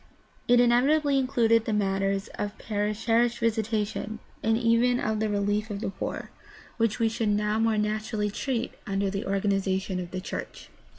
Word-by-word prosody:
It 245 0 +5
inevitably 275 +4 +4
included 230 -4 +3
the 220 - -1
matters 195 -1 0
of 205 +1 -5
parish 210 0 -2
visitation, 225 -2 0 0.2
and 225 0 +2
even 240 +1 +3
of 215 0 -1
the 220 0 0
relief 205 +1 0
of 205 -1 -4
the 205 - -3
poor, 195 - -5 0.5
which 225 -2 +1
we 230 - +2
should 220 -1 -1
PRACTICAL 210 0 +1
THEOLOGY 210 - 0
6ii - - +3
now 225 - +3
more 220 - +1
naturally 210 0 -1
treat 245 +2 -2
under 195 -1 0
the 200 +2 -3
organization 195 -1 0
of 175 -1 -5
the 185 - -4
church. 185 - -7
215 Hz, 175 wpm, -27 LUFS, 200-230 Hz, 0.5 s, It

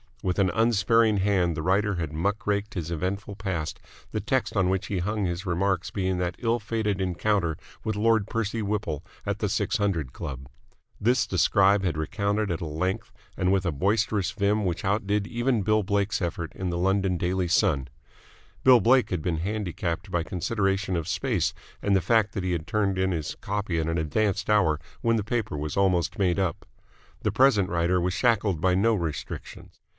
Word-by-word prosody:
With 90 +1 0
an 95 -2 +3
unsparing 115 0 +3
hand 95 -4 +2
the 80 - -3
writer 100 +3 +2
had 80 -4 -3
muck 100 +7 -1
raked 105 0 -1
his 85 -3 -3
eventful 95 +5 -3
past, 95 -6 -3 0.3
the 110 - -1
text 125 +5 -1
on 95 -2 +2
which 95 +1 -1
he 100 - -2
hung 105 +3 -1
his 90 +2 -3
remarks 90 0 0
being 95 -2 -1
that 90 0 -2
ill 120 0 +1
fated 105 -2 -1
encounter 90 -2 0 0.3
with 110 -2 -1
Lord 110 -1 +2
Percy 115 0 -2
Whipple 100 -8 -2 0.2
at - - -2
the - - 0
Six - - 0
Hundred 85 -11 -1
Club. 65 -2 -6 0.5
This 115 +1 +2
the 95 - -3
scribe 100 +2 +4
had 85 -4 -1
recounted 100 +5 -1
at 85 +2 -3
a - - -2
length 85 +5 -2 0.3
and 90 0 +2
with 95 -1 +2
a 85 - +1
boisterous 100 +3 +1
vim 100 +3 +1
which 90 -2 -2
outdid 100 +1 +1
even 120 0 0
Bill 110 +2 +3
Blake's 100 +1 0
effort 85 -2 -3
in 95 -1 -3
the 85 - -2
London 95 0 +1
Daily 90 +1 0
Sun. 85 -6 +2 0.8
Bill 130 -2 +8
Blake 125 +5 +4
had 90 -4 -2
been 85 -3 0
handicapped 90 -1 -3
by 85 - +1
consideration 95 +2 -1
of 85 -2 -2
space 105 - 0 0.3
and 100 -1 +2
the 95 - +3
fact 110 +3 +2
that 95 - -3
he 95 - -1
had 85 -1 -3
turned 100 -3 0
in 95 0 +1
his 80 -4 -3
copy 100 -4 -2
at 80 - -1
an 80 +1 0
advanced 100 +6 0
hour 80 -8 +3 0.2
when 115 0 +2
the 110 - 0
paper 110 -7 -2
was 75 +3 -4
almost 90 -2 +1
made 90 -2 +2
up. 95 -3 -1 0.6
The - - 0
present 115 -8 +4
writer 85 +1 +1
was 90 +1 0
shackled 105 -6 +1
by 95 0 +3
no 115 +5 +3
restrictions. 80 -6 -6
95 Hz, 190 wpm, -26 LUFS, 85-105 Hz, 0.8 s, Bill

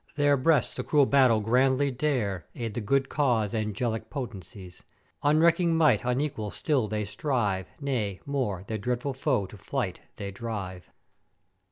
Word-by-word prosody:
Their 145 -1 +4
breasts 145 +1 +2
the - - -4
cruel 145 -2 +4
battle 130 -5 +4
grandly 130 +5 +2
dare, 120 - -1
aid 115 -3 -4
the 120 - -3
good 135 +6 +1
cause 120 -9 +1
angelic 110 +1 -2
Potencies; 95 - -8 0.4
unrecking 165 +3 +4
might 155 -10 +4
unequal 125 -3 -1
still 135 -1 0
they 105 0 -2
strive, 105 - -1
nay, 115 -9 -2
more, 125 -10 -2
their 110 +1 -4
dreadful 125 +5 -2
foe 130 -5 0
to 105 - -12
flight 100 -2 -3 0.2
they 100 -1 -5
drive! 100 -4 -6
120 Hz, 145 wpm, -27 LUFS, 105-140 Hz, 0.4 s, Their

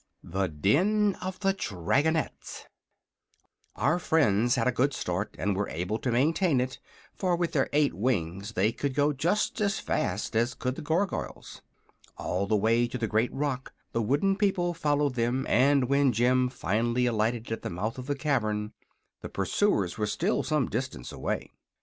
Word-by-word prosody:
THE 95 +2 -1
DEN 185 - +2
OF 185 0 -5
THE 195 -1 +2
DRAGONETTES 145 - -1 1.1
Our 160 +5 +1
friends 120 - +3
had 120 -1 +1
a - - +4
good 130 +2 +1
start 90 +1 -3
and 100 +1 0
were 100 +1 -1
able 90 +7 -2
to 125 - -1
maintain 150 +4 +2
it, 130 +1 -2 0.3
for 180 -3 0
with 170 -1 -1
their 135 -3 +1
eight 145 -1 +2
wings 100 -2 -2
they 105 +3 +2
could 140 +2 -3
go 145 +1 +3
just 180 - 0
as 200 -2 +1
fast - - -2
as 120 +3 +1
could 130 0 -2
the - - -7
Gargoyles. 170 +6 -2 0.6
All 95 +2 -2
the 105 - +2
way 115 +3 +2
to 125 - -5
the 120 - -1
great 110 +2 +1
rock 135 -2 -3 0.2
the 115 - 0
wooden 145 - +1
people 190 -4 +1
followed 145 -4 +1
them, 120 +2 0
and 135 +1 +4
when 140 0 +3
Jim 125 +3 +3
finally 120 +1 0
alighted 115 0 0
at 115 - -3
the - - -4
mouth 110 +8 -3
of 130 - -7
the 145 - 0
cavern 110 -7 -1 0.5
the - - -6
pursuers 100 - 0
were 105 - +1
still 105 - 0
some 150 -5 0
distance 115 - -4
away. - - -3
125 Hz, 170 wpm, -28 LUFS, 110-150 Hz, 1.1 s, a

